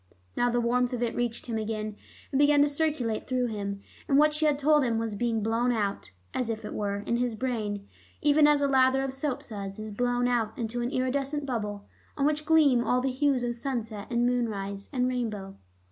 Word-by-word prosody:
Now 245 - +2
the 240 0 +1
warmth 245 +1 +1
of 245 -1 -1
it 235 - -1
reached 240 -1 -2
him 230 -2 -2
again, 215 -1 -3 0.4
and 270 - +1
began 290 0 +6
to - - +3
circulate 285 -7 -1
through 255 -1 +1
him. 200 -3 -4 0.3
And 275 - +3
what 300 +1 +5
she 305 0 +2
had 295 -2 +2
told 295 +1 +4
him 235 -3 +1
was 225 -2 -2
being 225 0 0
blown 230 +3 +1
out, 205 - -2 0.2
as 250 -3 -1
it 220 -1 -3
were, 200 -1 -2
in 235 - 0
his 245 -2 -1
brain, 215 -4 -3 0.3
even 295 0 +5
as 295 -1 +4
a - - +3
lather 265 0 +4
of 270 -1 -3
soapsuds 220 -8 -4
is 215 0 -6
blown 245 +3 +1
out 230 -3 0
into 240 +1 -2
an 240 - -1
iridescent 275 +3 -1
bubble, 210 -5 -3 0.3
on 280 - +1
which 300 0 0
gleam 290 -7 +5
all 250 +2 +2
the 260 +1 0
hues 265 -1 +1
of 240 0 -1
sunset 230 -4 -4
and 240 -1 +1
moonrise 200 -5 -2
and 250 -3 +1
rainbow. 215 -6 -3
245 Hz, 205 wpm, -28 LUFS, 220-270 Hz, 0.4 s, began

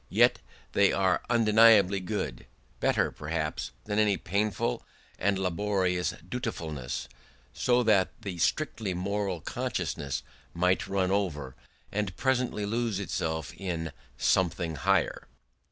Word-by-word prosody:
Yet - - +4 0.3
they 100 -1 +4
were 95 -1 +2
undeniably 110 -4 +6
good; 90 - -4 0.3
better, - - +2
perhaps, 75 0 -3 0.2
than 105 +1 0
any 105 -3 +3
painful 100 -6 -1 0.4
and 100 +1 +2
laborious 95 -1 0
dutifulness; 80 - -4 0.5
so 125 0 +2
that 105 -5 +4
the 100 -6 -6
strictly 105 - 0
moral 95 -1 -2
consciousness 70 -1 -3 0.3
might 90 +2 +2
run 95 -1 +1
over, 75 -10 -1 0.4
and 100 -4 -2
presently 125 -5 0
lose 115 -1 -1
itself 80 -5 -2
in 85 -4 -4 0.3
"something 85 -2 +1
higher". 90 +5 +1
95 Hz, 110 wpm, -29 LUFS, 85-105 Hz, 0.5 s, undeniably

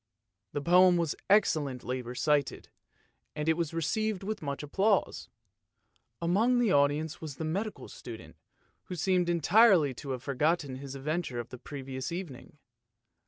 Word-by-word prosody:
The 145 - -2
poem 180 +1 +6
was 165 -3 -1
excellently 140 - +1
recited, 135 +3 -1 0.7
and 150 0 -3
it 160 - +5
was 170 -2 -2
received 205 +5 -1
with 215 +2 -4
much 140 -1 -4
applause. 195 +8 0 0.9
Among 210 +9 +2
the 240 -5 +2
audience 145 +2 +1
was 155 -4 -6
the 160 - -4
medical 200 +7 -3
student, - - -10 0.5
who 180 - -6
seemed 180 0 +1
entirely 175 - +5
to 140 +3 -9
have 130 -2 -4
forgotten 145 0 0
his 135 0 -8
adventure 145 -2 -3
of 120 - -6
the 125 - -10
previous 130 -1 -6
evening. 170 -6 -7
155 Hz, 140 wpm, -30 LUFS, 140-180 Hz, 0.9 s, poem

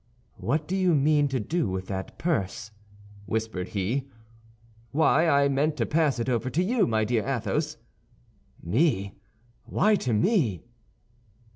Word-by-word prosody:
"What 145 +11 -1
do 190 - -2
you 185 -3 +3
mean 145 +1 +3
to 135 -2 -1
do 160 - -1
with 95 0 -3
that 95 0 -6
purse?" 110 - -2 0.6
whispered 110 -5 -2
he. 120 +8 -2 0.8
"Why, 160 +4 +3
I 140 -1 +4
meant 145 +3 0
to 115 - +1
pass 150 -3 +1
it 115 - -2
over 125 0 0
to 165 +8 0
you, 230 +4 +2
my 110 -1 +1
dear 115 -1 0
Athos." 120 -7 -2 0.9
"Me! 100 - +1 0.5
why 215 +2 +2
to 125 - -2
me?" 110 - +1
130 Hz, 140 wpm, -26 LUFS, 110-155 Hz, 0.9 s, I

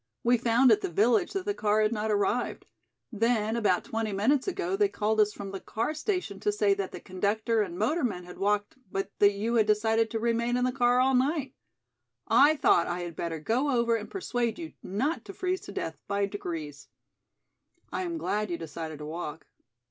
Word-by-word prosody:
We 240 +1 +4
found 240 +2 +4
at 215 -1 +4
the - - -2
village 225 - +2
that 390 -2 -3
the 410 - 0
car 215 - +1
had 215 - +2
not 220 0 -2
arrived. 210 +4 0 0.5
Then 225 0 +1
about 210 -6 +2
twenty 225 -1 -2
minutes 250 - +1
ago 380 0 -1
they 410 0 +3
called 220 - 0
us 210 -1 +4
from 200 -2 -7
the 195 - -5
car 230 +10 -2
station 315 - -2
to 210 - +1
say 205 -1 +2
that 195 -1 -3
the - - -7
conductor 215 +4 0
and 180 -4 -3
motorman 225 - 0
had 180 0 -11
walked 205 +3 0
but 195 +1 -3
that 205 0 +6
you 215 +4 -2
had 220 -3 +3
decided 220 +1 +2
to 225 - -2
remain 235 +1 +1
in 250 - 0
the 255 - +1
car 245 -1 +3
all 265 +1 +3
night. 270 +1 +1 0.7
I 280 +8 +6
thought 180 - +3
I 175 +1 -2
had 170 -2 -6
better 165 0 -3
go 245 - 0
over 235 -3 +2
and 220 -2 -5
persuade 245 - -2
you 330 -2 -7
not 260 - -2
to - - -8
freeze 370 0 -2
to - - -9
death - - -5
by 200 0 +1
degrees. 165 -8 -6 1.1
I - - -1
am 345 -2 -3
glad 210 -8 -1
you 170 - -2
decided 160 -1 -6
to 150 - -8
walk. 155 -1 -6
220 Hz, 205 wpm, -28 LUFS, 200-250 Hz, 1.1 s, that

